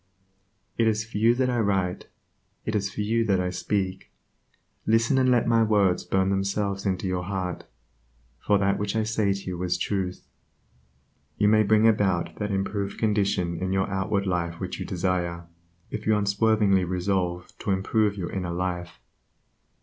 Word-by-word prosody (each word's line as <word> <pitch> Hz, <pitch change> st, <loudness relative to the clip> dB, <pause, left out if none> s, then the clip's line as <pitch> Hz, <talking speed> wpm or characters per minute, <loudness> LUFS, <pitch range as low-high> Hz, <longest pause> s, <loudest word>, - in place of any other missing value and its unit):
It 115 Hz, -, +4 dB
is 110 Hz, 0 st, +1 dB
for 110 Hz, -2 st, -5 dB
you 115 Hz, +2 st, +4 dB
that 125 Hz, 0 st, +1 dB
I 120 Hz, -, 0 dB
write; 95 Hz, -4 st, 0 dB, 0.6 s
it 110 Hz, -, -2 dB
is 100 Hz, -1 st, 0 dB
to 105 Hz, -, -2 dB
you 115 Hz, +2 st, +1 dB
that 100 Hz, -4 st, +2 dB
I 90 Hz, 0 st, -1 dB
speak. 95 Hz, -1 st, -2 dB, 0.8 s
Listen, 115 Hz, +4 st, +3 dB
and 130 Hz, 0 st, +3 dB
let 120 Hz, -2 st, +3 dB
my 115 Hz, -1 st, +4 dB
words 105 Hz, -5 st, +2 dB
burn 95 Hz, 0 st, +1 dB
themselves 100 Hz, 0 st, -1 dB
into 95 Hz, -1 st, -1 dB
your 90 Hz, -1 st, -1 dB
heart, 95 Hz, -2 st, -4 dB, 0.7 s
for 105 Hz, -, +2 dB
that 100 Hz, 0 st, +1 dB
which 105 Hz, 0 st, -2 dB
I 110 Hz, -, +2 dB
say 110 Hz, -2 st, +1 dB
to 100 Hz, 0 st, -3 dB
you 90 Hz, -1 st, -4 dB
is 90 Hz, -1 st, 0 dB
truth: 95 Hz, -3 st, -3 dB, 1.1 s
You 105 Hz, -, +3 dB
may 110 Hz, 0 st, +5 dB
bring 110 Hz, +1 st, +4 dB
about 100 Hz, -6 st, +1 dB
that 105 Hz, -1 st, -2 dB
improved 100 Hz, 0 st, -2 dB
condition 100 Hz, -6 st, 0 dB
in 95 Hz, 0 st, -1 dB
your 95 Hz, 0 st, +1 dB
outward 100 Hz, +1 st, 0 dB
life 85 Hz, -2 st, -2 dB
which 95 Hz, -2 st, -5 dB
you -, -, -5 dB
desire, 90 Hz, -2 st, -1 dB, 0.5 s
if -, -, -5 dB
you 110 Hz, -, +4 dB
will 105 Hz, -, +2 dB
unswervingly 100 Hz, -1 st, +3 dB
resolve 90 Hz, -1 st, -2 dB
to -, -, -5 dB
improve 100 Hz, +2 st, +1 dB
your 90 Hz, -3 st, -4 dB
inner 90 Hz, -2 st, -3 dB
life. 90 Hz, -1 st, -3 dB
100 Hz, 175 wpm, -26 LUFS, 90-105 Hz, 1.1 s, may